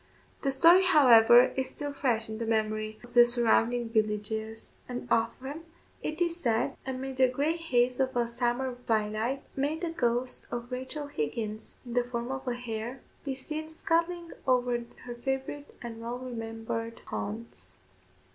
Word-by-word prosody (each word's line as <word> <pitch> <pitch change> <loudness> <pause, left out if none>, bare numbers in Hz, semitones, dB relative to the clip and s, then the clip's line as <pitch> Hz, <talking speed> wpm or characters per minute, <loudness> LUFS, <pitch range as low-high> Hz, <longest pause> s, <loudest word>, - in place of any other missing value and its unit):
The 275 - +1
story, 335 +8 +7
however, 245 -8 +7
is 265 0 -1
still 290 -1 -5
fresh 235 -5 0
in 220 0 -6
the 230 - -3
memory 215 -1 0
of 240 0 -13
the 240 0 +9
surrounding 240 0 +3
villagers; 220 0 -1 0.2
and 245 0 -5
often, 255 +7 0 0.4
it 310 +2 -4
is 340 0 -1
said, 235 -7 0
amid 265 0 -4
the 260 -1 +6
grey 285 +6 0
haze 250 -7 +1
of 260 -1 +1
a 240 -1 +2
summer 245 +2 -1
twilight, 220 +4 0
may 285 +3 0
the 335 0 -3
ghost 245 -3 0
of 240 +1 -5
Rachel 260 +4 -4
Higgins, 215 - -4
in 240 - -7
the 245 0 +3
form 240 0 -4
of 265 0 -5
a 245 - 0
hare, 240 +1 -5 0.2
be 275 -2 -3
seen 310 +4 -5
scudding 335 +1 -1 0.2
over 245 -2 +2 0.2
her 245 - -5
favourite 265 +4 -3
and 230 -1 -7
well 235 +1 -4
remembered 230 -2 -5
haunts. 105 -2 -4
245 Hz, 155 wpm, -29 LUFS, 225-270 Hz, 0.4 s, the